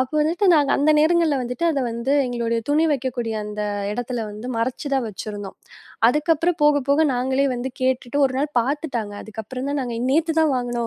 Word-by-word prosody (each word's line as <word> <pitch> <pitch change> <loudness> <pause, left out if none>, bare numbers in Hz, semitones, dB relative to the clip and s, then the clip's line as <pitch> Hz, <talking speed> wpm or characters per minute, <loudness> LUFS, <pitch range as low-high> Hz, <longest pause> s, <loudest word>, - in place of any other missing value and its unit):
அப்போ 260 +3 -2
வந்துட்டு 335 +6 +1
நாங்க 290 -3 +3
அந்த 290 +2 +3
நேரங்கள்ல 320 -2 +3
வந்துட்டு 250 +7 -2
அத 285 -4 -1
வந்து 235 +4 -2
எங்களுடைய 235 -1 -1
துணி 310 +3 +3
வைக்கக்கூடிய 245 -4 -2
அந்த 210 0 -5 0.3
இடத்துல 245 0 -3
வந்து 215 +3 -8
மறைச்சுதான் 260 +2 -1
வச்சிருந்தோம். 205 -1 -7 0.5
அதுக்கப்புறம் 325 +5 +1
போகப் 285 -2 +3
போக 285 +3 +4
நாங்களே 260 +2 +1
வந்து 245 +2 -3
கேட்டுட்டு 255 +1 0
ஒருநாள் 270 +3 -2
பாத்துட்டாங்க. 245 -5 -3
அதுக்கப்புறம் 225 +5 -6
தான் 285 -1 -1
நாங்க 240 -2 -4 0.2
நேத்து 320 +3 +2
தான் 315 -3 +3
வாங்கணும் 240 -1 -2
260 Hz, 165 wpm, -22 LUFS, 235-295 Hz, 0.5 s, போக